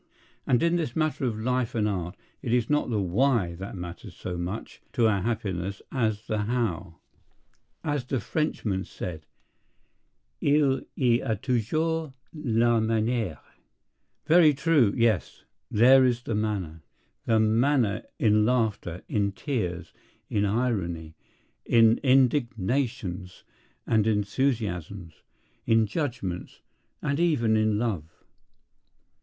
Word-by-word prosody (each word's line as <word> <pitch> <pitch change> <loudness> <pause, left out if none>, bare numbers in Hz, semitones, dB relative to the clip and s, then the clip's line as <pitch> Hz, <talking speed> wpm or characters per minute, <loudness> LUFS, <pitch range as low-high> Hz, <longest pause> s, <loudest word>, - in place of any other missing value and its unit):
And 125 - +3
in 170 +1 +3
this 155 -8 -3
matter 155 -3 0
of 115 -3 -1
life 125 +1 -1
and 105 -2 +1
art 90 -2 -3 0.3
it 120 - -3
is 120 +1 +1
not 150 -3 +1
the 110 -3 0
Why 100 0 +1
that 95 +4 -7
matters 90 -1 -8
so 90 - -5
much 90 +5 -5
to 120 - +2
our 100 -3 +1
happiness 100 -4 -3
as 110 -4 -1
the 110 - -2
How. 105 -7 -2 0.9
As 145 -4 -1
the 130 0 -1
Frenchman 105 - -2
said, 80 -7 -7 1.1
"Il 145 -2 +3 0.2
y 120 -3 +3
a 110 - 0
toujours 150 +7 -1 0.2
la 120 -6 +2
manière." 110 -4 0 0.9
Very 160 -3 +6
true. 140 -6 +3
Yes. 115 -4 +1 0.3
There 130 +5 +6
is 120 -1 +1
the 115 - -3
manner. 100 -7 -2 0.5
The 110 -1 +3
manner 110 0 +2 0.2
in 105 -1 +3
laughter, 110 -7 0
in 100 -2 0
tears, 90 - -3 0.4
in 105 0 +1
irony, 95 -8 -1 0.5
in 115 -1 +4
indignations 120 -7 0 0.4
and 110 -1 +2
enthusiasms, 100 - -2 0.5
in 115 -1 +4
judgments—and 120 - -5
even 140 -11 +2
in 110 -1 +2
love. 105 -9 -1
115 Hz, 115 wpm, -26 LUFS, 100-130 Hz, 1.1 s, Very